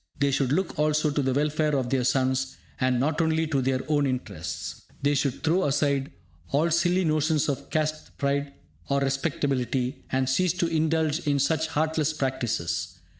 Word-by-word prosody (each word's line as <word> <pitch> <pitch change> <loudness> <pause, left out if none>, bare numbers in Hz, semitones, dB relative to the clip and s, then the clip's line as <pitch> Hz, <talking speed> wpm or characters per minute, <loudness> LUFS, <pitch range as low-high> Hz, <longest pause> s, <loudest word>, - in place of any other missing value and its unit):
They 140 0 +2
should 135 -1 +1
look 165 0 0
also 150 0 +2
to 145 - 0
the 130 -1 +1
welfare 150 +2 +1
of 130 -2 -2
their 130 -2 +2
sons, 130 +1 +1 0.2
and 130 -1 +2
not 155 +4 +1
only 160 0 +2
to 145 -4 0
their 130 0 0
own 145 -2 +2
interests. 125 -10 -5 0.2
They 145 +1 +3
should 140 -2 -1
throw 170 +4 +2
aside 140 -1 +1 0.4
all 155 +5 +2
silly 175 +2 +2
notions 155 -1 +2
of 140 -3 -3
caste 155 0 -2
pride 140 0 0 0.4
or 140 0 +2
'respectability', 135 -2 -1
and 130 0 +1
cease 170 +6 +2
to 180 -1 0
indulge 160 -1 +1
in 145 -1 +3
such 160 +3 +1
heartless 155 0 0
practices. 115 - -2
145 Hz, 170 wpm, -26 LUFS, 135-155 Hz, 0.4 s, They